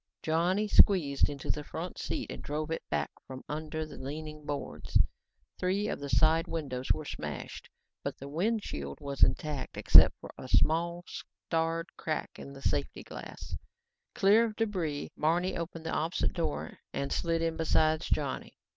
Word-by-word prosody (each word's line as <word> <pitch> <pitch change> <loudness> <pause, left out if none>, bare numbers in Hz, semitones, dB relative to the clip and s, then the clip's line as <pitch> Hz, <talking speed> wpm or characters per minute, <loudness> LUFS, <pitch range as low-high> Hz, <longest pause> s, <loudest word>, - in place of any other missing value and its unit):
Johnny 175 +6 +2
squeezed 165 -10 +5
into 140 -2 -2
the 150 - -4
front 170 +4 -6
seat 290 - -3
and - - -6
drove 155 +2 -3
it 165 - -1
back 75 -1 0 0.2
from 130 0 -8
under 155 +1 -3
more 155 - -10
leaning 150 +2 -6
boards. 145 -1 -1 0.6
Three 195 +3 +1
of - - -2
the 140 0 -5
side 155 +7 +4
windows 130 -6 -2
were 155 - +1
smashed - - -6 0.3
but - - -3
the 140 - -8
windshield 155 - -2
was 140 -1 -5
intact 150 -3 +1
except - - +8
for - - -9
a 130 - -7
small, 170 +5 +2
starred 165 -1 -2
crack 155 - -3
in 140 - -8
the 135 - -11
safety - - -1
glass. - - -8 0.6
Clear 210 +4 +6
of 220 -2 -4
the 225 - +2
debris, 165 -9 -3
Barney 175 +4 +1
opened 165 -1 -5
the 160 - -2
opposite 165 +3 0
door 165 -4 -3
and 140 - -2
slid 165 -1 0
in 165 -1 0
beside 160 -1 +3
Johnny. 145 -4 -2
160 Hz, 165 wpm, -31 LUFS, 145-170 Hz, 0.6 s, except